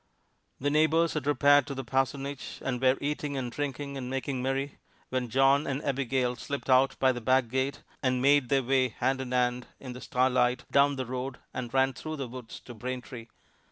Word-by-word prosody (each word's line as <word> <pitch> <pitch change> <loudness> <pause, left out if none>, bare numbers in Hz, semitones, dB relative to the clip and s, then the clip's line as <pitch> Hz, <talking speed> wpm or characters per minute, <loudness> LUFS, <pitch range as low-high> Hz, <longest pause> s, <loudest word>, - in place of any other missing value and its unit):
The 145 +2 0
neighbors 155 +2 +3
had 150 -3 -3
repaired 145 0 +5
to 140 - -5
the 135 - -4
parsonage 135 +2 -2
and 125 -2 -2
were 130 0 +4
eating 145 -1 -2
and 125 -2 -3
drinking 140 0 -4
and 125 -2 -5
making 135 0 -2
merry 135 +2 -2 0.3
when 130 -2 -2
John 135 +4 +3
and 135 0 -1
Abigail 130 -2 0
slipped 140 +1 -4
out 135 +1 +4
by 130 -1 +4
the 120 -1 -5
back 130 0 +2
gate, 130 +3 -2 0.2
and 130 -1 +1
made 140 -1 +4
their 135 -1 +3
way, 130 0 +2
hand 130 +3 -1
in 130 -1 -6
hand, 125 0 0
in 130 -2 -7
the 125 - -9
starlight, 125 -1 +1
down 140 0 +4
the 130 -1 -3
road 130 +1 -4 0.2
that 120 -2 -5
ran 135 0 +2
through 155 +4 -6
the 135 -4 -4
woods 120 -2 -9
to 120 - -10
Braintree. 125 0 -6
130 Hz, 195 wpm, -29 LUFS, 125-140 Hz, 0.3 s, repaired